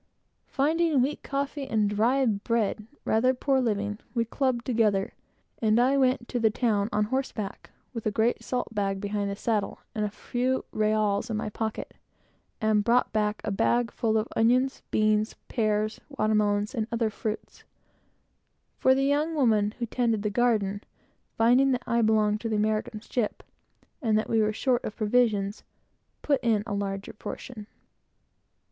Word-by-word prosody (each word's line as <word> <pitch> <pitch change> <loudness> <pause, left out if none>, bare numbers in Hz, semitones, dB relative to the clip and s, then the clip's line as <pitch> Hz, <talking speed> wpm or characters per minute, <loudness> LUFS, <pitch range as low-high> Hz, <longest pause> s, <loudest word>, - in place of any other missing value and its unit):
Finding 310 -1 +2
wheat 285 +3 -2
coffee 275 0 -3
and 215 -4 +1
dry 235 +6 +2
bread 215 0 0 0.2
rather 255 +4 +3
poor 270 +1 +1
living, 210 -3 -1 0.2
we 230 -1 +1
dubbed 245 0 -1
together, 215 -5 +1 0.5
and 220 0 +3
I 260 +3 +4
went 260 -2 +3
up - - -16
to 245 - -1
the 225 -1 +4
town 215 -2 0
on 210 +1 +2
horseback 220 -4 -3 0.2
with 230 -3 -3
a - - +1
great 225 +3 +1
salt 250 -2 -3
bag 195 -2 -1
behind 205 0 -2
the 200 - -3
saddle, 215 0 -1 0.2
and 215 - -2
a 210 - 0
few 250 +5 -2
reáls 215 -1 +1
in 220 - -1
my 215 - -3
pocket, 220 0 -4 0.7
and 215 -1 +2
brought 240 +2 +2
back 210 -1 0
the - - -2
bag 235 +4 +1
full 220 -2 0
of 215 +1 0
onions, 250 +4 +2
pears, 215 0 +2
beans, 215 -1 0
water 215 -6 0
melons, 210 +1 +1
and 220 -4 -2
other 230 -2 0
fruits; 215 +1 -5 1.2
for 260 - +5
the 270 - +1
young 300 +3 +1
woman 220 -6 +2
who 240 - -2
tended 230 -3 0
the 210 - -1
garden, 210 -3 +1 0.6
finding 250 +4 +4
that 250 0 -2
I 235 0 +1
belonged 215 -1 +2
to 230 - -3
the 220 - 0
American 215 0 -1
ship, 230 -1 -2 0.6
and 220 -5 +2
that 215 - -1
we 225 -1 +3
were 215 0 +2
short 245 +3 0
of 215 - -5
provisions, 215 -3 +1 0.6
put 280 -3 +2
in 220 -3 +2
a 215 -3 -3
double 195 -1 -2 0.2
portion. 215 -5 -7
220 Hz, 165 wpm, -27 LUFS, 210-245 Hz, 1.2 s, for